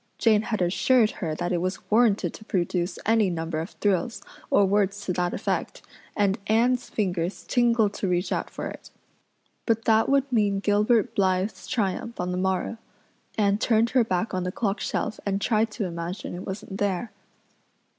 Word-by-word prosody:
Jane 215 -2 +4
had 215 -4 -1
assured 215 +6 +3
her 160 -5 -4
that 175 +2 -2
it 175 - +1
was 185 +3 -4
warranted 220 -2 +3
to - - -11
produce 175 -1 -1
any 220 -2 +3
number 165 -2 -3
of 165 +4 -4
thrills, 205 +3 -1 0.3
or 200 - +5
words 200 0 +1
to 180 - -1
that 175 0 0
effect, - - -3 0.3
and 205 +1 +2
Anne's 240 +3 +2
fingers 180 -3 -2
tingled 230 -4 +3
to 195 - -3
reach 180 0 0
out - - -1
for - - -6
it. - - -10 0.8
But 225 -1 +1
that 220 0 +4
would 275 0 +2
mean 205 -4 +2
Gilbert 210 +3 +2
Blythe's 190 0 0
triumph 225 +2 -2
on 180 0 -1
the 180 - -2
morrow. 190 +4 -1 0.6
Anne 205 -1 +2
turned 230 0 +2
her 255 -2 +4
back 205 0 -1
on 185 -1 -1
the 180 - -2
clock 205 0 -1
shelf 215 - -2
and 200 -1 -1
tried 220 +1 +1
to 210 - -2
imagine 170 +2 -5
it 175 - -7
wasn't 195 0 -6
there. 205 +2 -1
205 Hz, 175 wpm, -25 LUFS, 185-225 Hz, 0.8 s, or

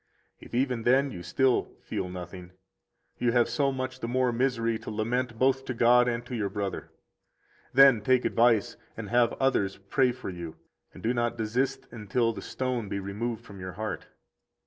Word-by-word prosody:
If - - -9
even 125 -2 0
then 135 +4 +3
you 90 - -7
still 125 +9 +1
feel 90 - -4
nothing, 90 0 -8 0.7
you 120 -1 +1
have 120 -1 +4
so 135 +4 +1
much 130 -1 -4
the 115 - -4
more 125 +1 +1
misery 115 -2 0
to 110 - -8
lament 115 +3 -2
both 130 +2 +2
to 130 - -4
God 120 +1 +5
and 120 0 -2
to 125 - -5
your 105 -3 -1
brother. 100 -1 -4 0.8
Then 135 -4 +7
take 125 +3 +2
advice 115 -4 +3 0.2
and - - -6
have 120 -1 +3
others 105 -8 0
pray 125 +6 +1
for 125 -5 -7
you, 85 -3 -7 0.4
and - - -14
do 115 +3 +1
not 120 -1 -1
desist 115 +4 -1
until 115 +1 0
the - - -7
stone 125 -5 -3
be 100 - -2
removed 110 +4 -4
from 100 -4 -11
your 95 0 -6
heart. 110 0 -5
120 Hz, 180 wpm, -28 LUFS, 105-125 Hz, 0.8 s, Then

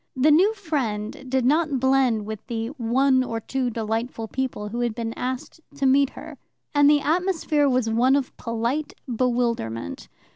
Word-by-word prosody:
The 275 +4 +4
new 365 +8 +5
friend 260 - -3
did 260 -1 +1
not 300 0 +2
blend 260 -4 +2
with 215 -1 -7
the 230 -2 -3
"one 260 0 +2
or 230 -2 -3
two 255 +2 -2
delightful 225 +1 -3
people" 250 -5 -3
who 235 +3 -4
had 240 -2 -1
been 230 -1 -3
asked 255 +6 -5
to 280 -1 -1
meet 270 +1 +4
her, - - -11 0.3
and 290 -1 +5
the 295 -1 +4
atmosphere 320 -2 +1
was 255 -3 +1
one 240 +4 +3
of 275 -2 -2
polite 235 +6 -2
bewilderment. 235 - -1
255 Hz, 160 wpm, -24 LUFS, 230-280 Hz, 0.3 s, new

